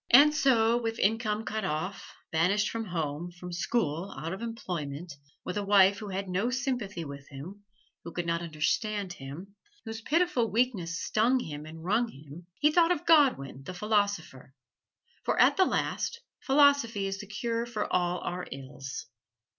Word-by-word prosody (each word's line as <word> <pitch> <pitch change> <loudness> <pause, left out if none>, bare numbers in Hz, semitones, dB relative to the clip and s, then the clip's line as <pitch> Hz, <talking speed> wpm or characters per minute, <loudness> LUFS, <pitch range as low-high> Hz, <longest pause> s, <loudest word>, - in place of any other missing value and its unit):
And 290 +5 +8
so, 240 -6 +4
with 225 -1 -2
income 220 +1 +1
cut 220 -3 -2
off, 170 +3 -4 0.2
banished 190 +6 +2
from 225 -1 -3
home, 165 -2 -3
from 180 0 -9
school, 175 -2 -1
out 165 +3 -4
of 195 - -6
employment, 175 -9 -5 0.3
with 180 - -3
a 205 - 0
wife 200 0 +5
who 210 - -6
had 195 +1 -3
no 190 +6 0
sympathy 245 - -2
with 140 0 -9
him 175 +9 -9 0.4
who 170 - -7
could 175 +1 -3
not 170 0 0
understand 180 +5 -1
him 160 +8 -9 0.3
whose 225 0 -6
pitiful 300 -4 +2
weakness 200 -7 0
stung 240 +4 +2
him 150 -7 -6
and 160 +1 -10
wrung 215 +7 +2
him, 150 0 -12
he 300 - +4
thought 340 +1 +4
of 350 - -1
Godwin, 265 - +4
the 185 +6 -7
philosopher: 200 - -1 0.7
for - - 0
at - - +6
the 375 - +5
last 470 - -1 0.2
philosophy 270 -7 +4
is 195 0 -3
the 205 - -8
cure 230 +3 -2
for 235 -3 -2
all 180 0 +1
our 180 +1 -4
ills. 135 0 -7
195 Hz, 165 wpm, -29 LUFS, 170-230 Hz, 0.7 s, And